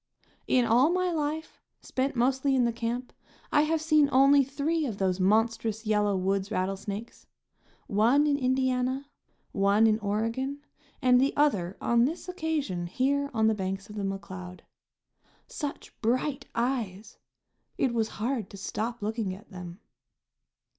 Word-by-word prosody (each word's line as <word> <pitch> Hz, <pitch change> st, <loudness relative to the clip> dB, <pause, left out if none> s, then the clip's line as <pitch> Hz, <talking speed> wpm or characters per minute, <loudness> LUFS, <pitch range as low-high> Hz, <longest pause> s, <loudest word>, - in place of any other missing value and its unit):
In 250 Hz, -2 st, +3 dB
all 245 Hz, +6 st, +4 dB
my 365 Hz, 0 st, +1 dB
life, 310 Hz, 0 st, -3 dB, 0.2 s
spent 265 Hz, +2 st, -2 dB
mostly 265 Hz, +3 st, +2 dB
in 250 Hz, -2 st, +3 dB
the 235 Hz, -, 0 dB
camp, 235 Hz, +2 st, -3 dB, 0.4 s
I 295 Hz, -, +5 dB
have 315 Hz, +1 st, 0 dB
seen 305 Hz, -3 st, +4 dB
only 275 Hz, +1 st, +6 dB
three 285 Hz, +3 st, -1 dB
of 215 Hz, -5 st, -4 dB
those 190 Hz, -1 st, 0 dB
monstrous 220 Hz, +2 st, +1 dB
yellow 210 Hz, -2 st, +2 dB
woods 195 Hz, +1 st, 0 dB
rattlesnakes; 195 Hz, +2 st, -4 dB, 0.6 s
one 235 Hz, +8 st, +3 dB
in 290 Hz, -1 st, +3 dB
Indiana, 260 Hz, +1 st, 0 dB, 0.4 s
one 200 Hz, +2 st, +3 dB
in 220 Hz, 0 st, +3 dB
Oregon 230 Hz, +7 st, -2 dB, 0.4 s
and 250 Hz, 0 st, +5 dB
the 275 Hz, +2 st, +1 dB
other 200 Hz, -11 st, +1 dB
on 235 Hz, 0 st, +3 dB
this 320 Hz, +7 st, -4 dB
occasion 310 Hz, -, -2 dB
here 280 Hz, +8 st, 0 dB
on 220 Hz, -2 st, +1 dB
the 220 Hz, -, +4 dB
banks 195 Hz, 0 st, -4 dB
of -, -, -10 dB
the 210 Hz, -, -3 dB
McCloud. 190 Hz, -2 st, -6 dB, 0.8 s
Such 290 Hz, -2 st, -6 dB
bright 255 Hz, +5 st, 0 dB
eyes! 225 Hz, -4 st, -2 dB, 0.6 s
It 260 Hz, -3 st, +1 dB
was 225 Hz, -2 st, +1 dB
hard 230 Hz, -1 st, -2 dB
to 200 Hz, -, -10 dB
stop 225 Hz, +3 st, -4 dB
looking 215 Hz, -3 st, -2 dB
at 210 Hz, +3 st, -16 dB
them. 180 Hz, +1 st, -9 dB
235 Hz, 145 wpm, -28 LUFS, 205-275 Hz, 0.8 s, only